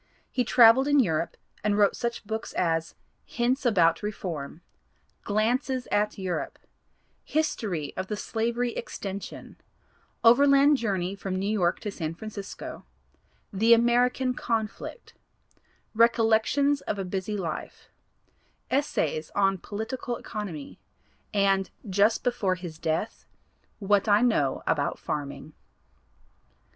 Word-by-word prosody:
He 250 Hz, -, +1 dB
traveled 240 Hz, +3 st, +6 dB
in 290 Hz, 0 st, +4 dB
Europe 165 Hz, -8 st, 0 dB, 0.3 s
and 210 Hz, -1 st, +1 dB
wrote 205 Hz, -1 st, +4 dB
such 235 Hz, -2 st, -3 dB
books 220 Hz, +1 st, -4 dB
as 165 Hz, -2 st, 0 dB, 0.3 s
"Hints 250 Hz, +3 st, 0 dB
About 170 Hz, -7 st, +3 dB
Reform," 175 Hz, -7 st, -5 dB, 0.6 s
"Glances 245 Hz, +5 st, 0 dB
at 210 Hz, +1 st, +1 dB
Europe," 185 Hz, -3 st, -3 dB, 0.7 s
"History 205 Hz, -, -2 dB
of 185 Hz, -, -4 dB
the 210 Hz, -, -3 dB
Slavery 235 Hz, +3 st, -1 dB
Extension," 195 Hz, 0 st, -7 dB, 0.7 s
"Overland 280 Hz, +4 st, +6 dB
Journey 195 Hz, -6 st, -1 dB
from 195 Hz, -1 st, -4 dB
New 190 Hz, +1 st, -2 dB
York 190 Hz, -5 st, +1 dB
to 210 Hz, -, -4 dB
San 165 Hz, -4 st, -4 dB
Francisco," 205 Hz, 0 st, -8 dB, 0.7 s
"The 225 Hz, +4 st, +6 dB
American 245 Hz, +2 st, +2 dB
Conflict," 225 Hz, -, -4 dB, 0.8 s
"Recollections 230 Hz, +5 st, +3 dB
of 210 Hz, -, -1 dB
a 195 Hz, -, -3 dB
Busy 190 Hz, +3 st, -3 dB
Life," 165 Hz, -5 st, -5 dB, 0.8 s
"Essays 160 Hz, -, 0 dB
on 195 Hz, -1 st, +2 dB
Political 230 Hz, +5 st, -4 dB
Economy," 190 Hz, -10 st, -7 dB, 0.5 s
and 195 Hz, -2 st, +2 dB, 0.2 s
just 205 Hz, +3 st, +2 dB
before 235 Hz, -7 st, +1 dB
his 175 Hz, -3 st, -8 dB
death, 160 Hz, +7 st, -2 dB, 0.5 s
"What 205 Hz, 0 st, +2 dB
I 205 Hz, +1 st, +5 dB
Know 150 Hz, -, +1 dB
About 145 Hz, -2 st, 0 dB
Farming." 150 Hz, +1 st, -5 dB
210 Hz, 110 wpm, -27 LUFS, 185-235 Hz, 0.8 s, traveled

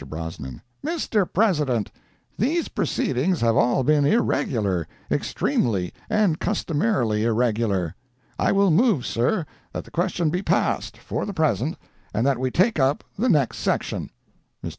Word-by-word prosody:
Brosnan—"Mr. 120 Hz, -, -4 dB
President, 150 Hz, -, +1 dB, 0.4 s
these 315 Hz, -, 0 dB
proceedings 145 Hz, +7 st, 0 dB
have 115 Hz, -1 st, +3 dB
all 125 Hz, +2 st, +3 dB
been 150 Hz, +2 st, +3 dB
irregular, 110 Hz, -, +1 dB, 0.2 s
extremely 95 Hz, -7 st, 0 dB, 0.2 s
and 200 Hz, -7 st, +2 dB
customarily 150 Hz, -, 0 dB
irregular. 110 Hz, -7 st, +1 dB, 0.5 s
I -, -, +3 dB
will 195 Hz, -2 st, +4 dB
move, 185 Hz, -, +3 dB
sir, 150 Hz, -, 0 dB, 0.3 s
that -, -, -4 dB
the -, -, -17 dB
question 175 Hz, -2 st, 0 dB
be 180 Hz, +2 st, -1 dB
passed, -, -, 0 dB
for -, -, -4 dB
the 200 Hz, -, -5 dB
present, 155 Hz, -, 0 dB, 0.4 s
and 115 Hz, -, +1 dB
that 135 Hz, -3 st, +2 dB
we 130 Hz, 0 st, 0 dB
take 185 Hz, -, +2 dB
up 135 Hz, +2 st, +2 dB
the 245 Hz, +6 st, +1 dB
next 140 Hz, -, +2 dB
section." -, -, -1 dB, 0.6 s
Mr. -, -, -2 dB
140 Hz, 135 wpm, -24 LUFS, 115-190 Hz, 0.6 s, will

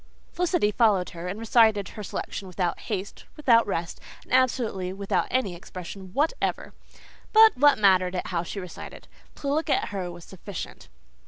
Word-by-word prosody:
Felicity 350 Hz, -, +1 dB
followed 210 Hz, -5 st, +2 dB
her 170 Hz, +1 st, -7 dB
and 185 Hz, +3 st, -4 dB
recited 220 Hz, -3 st, +3 dB
her 215 Hz, -, -9 dB
selection 200 Hz, 0 st, -5 dB
without 180 Hz, -1 st, -2 dB
haste, 200 Hz, -2 st, -5 dB
without 235 Hz, -7 st, +4 dB
rest, 170 Hz, -3 st, -3 dB, 0.2 s
and -, -, -9 dB
absolutely 235 Hz, -8 st, +1 dB
without 195 Hz, +1 st, -1 dB
any 250 Hz, -8 st, 0 dB
expression 185 Hz, +2 st, -9 dB
whatever. 310 Hz, -, -1 dB, 0.6 s
But 440 Hz, 0 st, +8 dB
what 290 Hz, +2 st, +5 dB
mattered 185 Hz, -3 st, +4 dB
it 180 Hz, -, -2 dB
how 175 Hz, -2 st, -1 dB
she 175 Hz, +4 st, -6 dB
recited? 180 Hz, -2 st, -9 dB, 0.3 s
To 280 Hz, -, -7 dB
look 315 Hz, +2 st, -1 dB
at -, -, +1 dB
her 190 Hz, -3 st, -4 dB
was 175 Hz, -1 st, -11 dB
sufficient. 190 Hz, 0 st, -8 dB
200 Hz, 160 wpm, -26 LUFS, 180-250 Hz, 0.6 s, But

